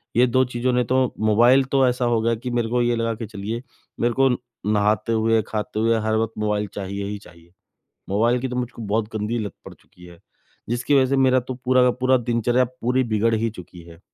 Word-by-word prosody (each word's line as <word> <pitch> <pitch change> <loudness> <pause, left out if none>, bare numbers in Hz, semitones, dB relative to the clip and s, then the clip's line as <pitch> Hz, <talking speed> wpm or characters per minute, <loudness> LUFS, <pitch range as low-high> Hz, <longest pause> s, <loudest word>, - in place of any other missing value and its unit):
ये 120 +2 +5
2 130 +2 +3
चीज़ों 125 +1 -1
ने 125 0 +2
तो 130 +2 0 0.2
मोबाइल 120 +5 +4
तो 135 -2 +4
ऐसा 125 0 0
हो 120 -1 +2
गया 115 +1 +1
कि 125 +3 -6
मेरे 120 -2 -1
को 125 +1 +1
ये 120 0 +1
लगा 115 0 -1
के 115 +1 -6
चलिए, 110 +2 -5 0.4
मेरे 120 0 +1
को 135 +2 +3 0.4
नहाते 105 +1 +1
हुए, 110 0 +2
खाते 105 0 -4
हुए, 115 +1 +2
हर 110 0 0
वक़्त 110 0 -1
मोबाइल 105 -1 -1
चाहिए 100 0 -4
ही 105 +1 -4
चाहिए। 85 -3 -18 0.6
मोबाइल 115 +5 +2
की 130 - -3
तो 125 - -5
मुझको 125 -1 -4
बहुत 105 +1 -1
गंदी 110 +3 -2
लत 100 - -6
पड़ - - -10
चुकी 90 - -19
है 85 -1 -15 0.5
जिसकी 120 +5 -1
वज़ह 130 - +2
से 135 - +1
मेरा 130 -1 +4
तो 125 +1 -6
पूरा 130 0 +4
का 125 - +4
पूरा 130 +1 +3
दिनचर्या 120 +1 +1 0.2
पूरी 125 +2 +1
बिगड़ 115 +2 +2
ही 115 +1 0
चुकी 90 -1 -12
है। 85 0 -14
115 Hz, 225 wpm, -22 LUFS, 105-125 Hz, 0.6 s, ये